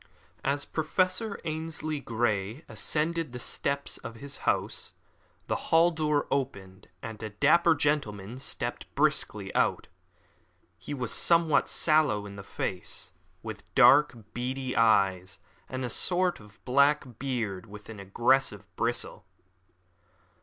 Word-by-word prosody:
As 140 +1 0
Professor 185 +6 -1
Ainslie 155 -1 -3
Grey 115 - -2
ascended 160 -2 -2
the 125 - -6
steps 140 +3 -1
of 115 - -8
his 140 +4 -5
house, - - -1 0.5
the - - -1
hall 165 +2 +5
door 150 -3 0
opened 100 -9 -3 0.2
and 110 -1 -7
a 110 - -4
dapper 160 +10 +4
gentleman 125 -7 -1
stepped 135 - -3
briskly - - +1
out. - - +1 0.9
He 145 - -6
was 125 -4 -2
somewhat 165 -3 +4
sallow 155 -10 +3
in 100 -1 -9
the 100 - -8
face, 95 -2 -4 0.3
with - - -9
dark, 145 -3 +6 0.2
beady 130 +1 -3
eyes, 95 -5 +3 0.3
and 130 0 -3
a - - -3
short, 180 -1 +1 0.2
black 140 -2 +2
beard 115 -9 -3
with 105 0 -12
an 110 -2 -9
aggressive 105 +2 +1
bristle. 120 +3 -2
130 Hz, 120 wpm, -28 LUFS, 110-155 Hz, 0.9 s, dark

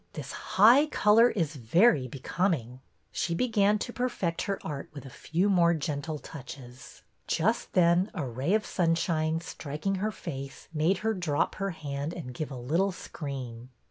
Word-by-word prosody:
This - - -6
high 240 +10 +5
color 225 -3 +5
is 165 -9 -1
very 140 - +3
becoming." 130 - -2 0.3
She 170 - -1
began 210 -1 +2
to 240 +3 -5
perfect 200 -9 -1
her 195 -1 -2
art 145 -3 -5
with 140 - -8
a 135 - -10
few 175 +9 -1
more 170 -4 +4
gentle 150 0 -3
touches. 130 -4 -11 0.2
Just 220 +8 0
then 180 +1 +4
a 160 -7 -2
ray 130 - 0
of 215 - 0
sunshine, 165 -2 0
striking 155 +3 -4
her 215 +1 0
face, 140 -8 -7
made 165 +5 +2
her 225 - +2
drop 170 -7 0
her 195 - 0
hand 145 -2 -4
and 135 -8 -7
give 150 +3 -4
a 135 - -7
little 165 +11 +1
scream. 130 -9 -7
165 Hz, 160 wpm, -28 LUFS, 140-195 Hz, 0.3 s, high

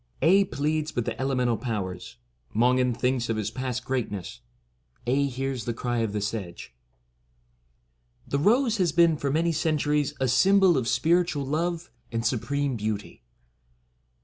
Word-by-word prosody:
Aedh 195 +4 +4
pleads 155 +2 -1
with 120 - -1
the - - -4
Elemental 125 -3 +1
Powers. 95 - -5 0.4
MONGAN 125 +1 +3
thinks 125 -1 0
OF 115 - 0
HIS 110 0 -2
PAST 125 -1 -4
GREATNESS. 105 - -3 0.7
Aedh 140 +3 +1
hears 130 -2 -3
the 120 - -2
Cry 120 0 -2
of 115 -2 0
the 105 0 -2
Sedge. 100 - -5 1.5
The 140 - -1
Rose 230 - +3
has 180 -4 +2
been 170 0 +4
for 140 -1 -2
many 165 +4 +1
centuries 150 -2 0
a 130 - +1
sym 190 +11 +4
bol 190 -3 +5
of 125 -4 0
spiritual 170 -1 +1
love 165 +2 -2 0.2
and 115 0 -2
supreme 140 +1 -1
beauty. 105 -1 -4
130 Hz, 150 wpm, -26 LUFS, 115-155 Hz, 1.5 s, bol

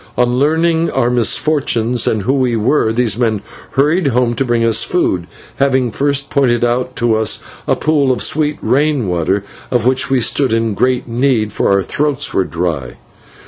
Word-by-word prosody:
On 125 0 +1
learning 160 +3 +1
our 120 -2 0
misfortunes 125 -1 +1
and 110 -3 0
who 130 - +1
we 130 -4 +1
were, 110 +1 +1
these 115 -2 0
men 110 -4 0 0.3
hurried 150 +5 +2
home 125 -2 +1
to 120 - -1
bring 120 -2 0
us 115 -1 +2
food, 90 - -1 0.3
having 130 -3 +1
first 140 +1 -1
pointed 120 -4 +2
out 125 +1 -2
to 115 -1 +1
us 110 -1 +1 0.3
a - - +2
pool 145 -4 +1
of 125 - 0
sweet 150 0 0
rain 145 -4 +1
water, 90 +3 -1 0.3
of 120 -2 0
which 130 +2 +2
we 135 -1 +2
stood 125 +1 +1
in 115 -1 0
great 125 +5 0
need, 120 -3 0
for - - 0
our 100 -1 +2
throats 145 +2 -1
were 95 - +1
dry. 80 -8 -4
125 Hz, 180 wpm, -15 LUFS, 110-140 Hz, 0.3 s, hurried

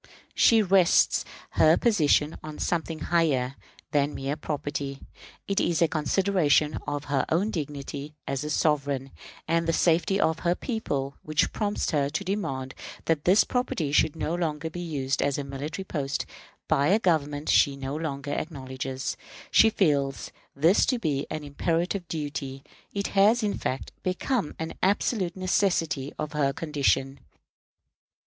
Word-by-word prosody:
She 225 -2 +5
rests 185 -2 +4 0.3
her 160 +1 +5
position 155 -8 +3
on 155 0 -8
something 165 -2 -1 0.2
higher 135 -7 +2 0.4
than 145 -1 +1
mere 135 +2 -2
property. 145 -2 -4 0.5
It 195 - +1
is 170 -2 +1
a 170 - +4
consideration 155 -1 +2
of 145 0 -2
her 140 -2 0
own 190 +7 +1
dignity 145 -2 -5
as 135 +1 -2
a 150 - -4
sovereign, 140 -3 0 0.4
and 165 0 +1
the 165 - +2
safety 175 +4 +2
of 160 -3 +2
her 175 0 +1
people, 140 - -3
which 155 0 0
prompts 205 -1 -1
her 140 -2 +1
to 155 +7 -3
demand 135 -10 -3 0.3
that 160 -3 0
this 190 +4 +6
property 245 - -1
should 150 +1 +3
not 165 +2 -2
longer 160 -1 -2
be 175 - -6
used 135 -5 -2
as 140 -1 +1
a 145 - -2
military 145 +7 -5
post 140 -6 -2 0.4
by 140 +1 +3
a 195 - +5
Government 150 -7 0
she 140 -2 +4
no 135 +1 -5
longer 145 -3 -4
acknowledges. 130 -3 -4 0.4
She 225 - +7
feels 140 - 0 0.2
this 165 +8 +4
to 255 - +2
be 150 -9 -1
an 155 -1 -4
imperative 170 +5 -1
duty. 145 -3 -4 0.3
It 200 0 -2
has, 210 +4 +4
in 205 - 0
fact, 130 - -3
become 185 - -1
an 160 0 -4
absolute 190 -1 +1
necessity 175 -7 0
of 150 - -4
her 140 -2 +1
condition. 140 -3 0
155 Hz, 150 wpm, -27 LUFS, 140-175 Hz, 0.5 s, She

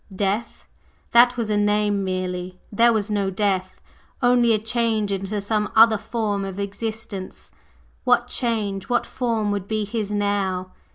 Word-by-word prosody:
Death? 205 +4 -2 0.4
That 245 +1 +6
was 225 -3 -1
a 210 - +2
name 205 -1 +1
merely; 185 -1 -3
there 235 +3 +4
was 215 -1 -1
no 200 -2 0
death, 190 -1 -1 0.4
only 245 -1 +4
a 220 - +4
change 225 -1 0
into 195 +2 -2
some 210 0 -1
other 220 -1 +6
form 210 -4 -2
of 195 -1 -5
existence. 205 -1 -6 0.5
What - - +3
change 215 -5 -1
what 245 - +1
form 225 -4 -1
would 200 -2 -3
be 215 -1 -1
his 210 -1 -3
now? 200 -3 -1
205 Hz, 150 wpm, -23 LUFS, 195-225 Hz, 0.5 s, That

